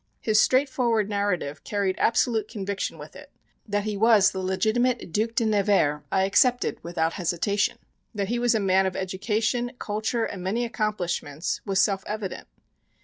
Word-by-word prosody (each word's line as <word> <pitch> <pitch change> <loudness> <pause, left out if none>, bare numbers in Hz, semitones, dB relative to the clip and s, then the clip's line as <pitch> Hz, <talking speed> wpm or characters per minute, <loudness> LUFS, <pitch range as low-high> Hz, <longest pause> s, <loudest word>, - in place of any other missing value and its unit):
His 215 -1 +3
straightforward 250 -5 +2
narrative 200 -8 -2
carried 200 -2 -1
absolute 225 -2 +2
conviction 200 -3 -4
with - - -11
it; - - -12 0.4
that 205 -1 -1
he 215 0 -3
was 210 -1 +5
the 190 - -5
legitimate 220 +4 0
Duc 225 +4 0
de 230 - +2
Nevers 200 -8 +2
I 190 - +2
accepted 245 +6 +2
without 165 -1 -1
hesitation; 200 +5 0 0.4
that 200 -1 -2
he 240 +1 0
was 240 -1 +2
a - - +2
man 190 -1 +3
of 185 - -4
education, 215 +6 -1
culture 220 +2 -2
and 190 - -6
many 215 +7 -1
accomplishments, 185 -8 -2
was 195 -1 +1
self 195 +1 +2
evident. 210 -3 -5
205 Hz, 155 wpm, -25 LUFS, 190-225 Hz, 0.4 s, was